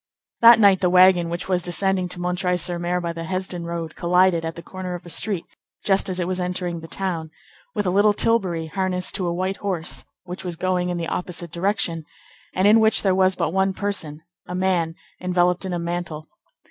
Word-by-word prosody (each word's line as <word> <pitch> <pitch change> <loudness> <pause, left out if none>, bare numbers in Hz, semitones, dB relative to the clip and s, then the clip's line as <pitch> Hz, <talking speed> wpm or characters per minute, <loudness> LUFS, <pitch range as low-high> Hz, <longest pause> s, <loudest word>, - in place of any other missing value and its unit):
That 230 0 +9
night 200 -3 +5
the 180 - +3
wagon 180 -1 +5
which 170 +1 -4
was 180 -2 +1
descending 185 +1 0
to 175 0 -3
M. 180 0 0
sur 175 -1 -1
M. 180 +1 0
by 170 0 -2
the 165 0 -6
Hesdin 185 -1 -4
road, 170 -1 -5
collided 180 -1 +3
at 165 0 -4
the 170 - -9
corner 185 0 -6
of 175 - -10
a 175 - -7
street, 195 -3 0 0.4
just 195 -1 +2
as 185 0 -3
it 175 - -1
was 185 0 -1
entering 180 -1 -3
the 165 - -10
town, 170 -4 -3 0.5
with 210 -2 -1
a 180 - +1
little 205 +3 +4
tilbury 195 -7 +1
harnessed 180 +1 -1
to 190 -2 0
a - - 0
white 185 +2 -2
horse, 185 -5 -3 0.2
which 180 +1 -8
was 175 -2 -4
going 180 +1 -1
in 175 - -2
the 170 - -3
opposite 175 -2 -4
direction, 170 -2 -1 0.5
and 185 +2 +3
in 215 +2 +7
which 220 0 +3
there 190 -2 +3
was 185 0 +3
but 160 - -1
one 190 0 +1
person, 165 -7 -3 0.2
a 180 - -5
man 180 -3 0 0.3
enveloped 180 0 +1
in 190 - -3
a - - -1
mantle. 170 -2 -4
180 Hz, 210 wpm, -22 LUFS, 170-190 Hz, 0.5 s, That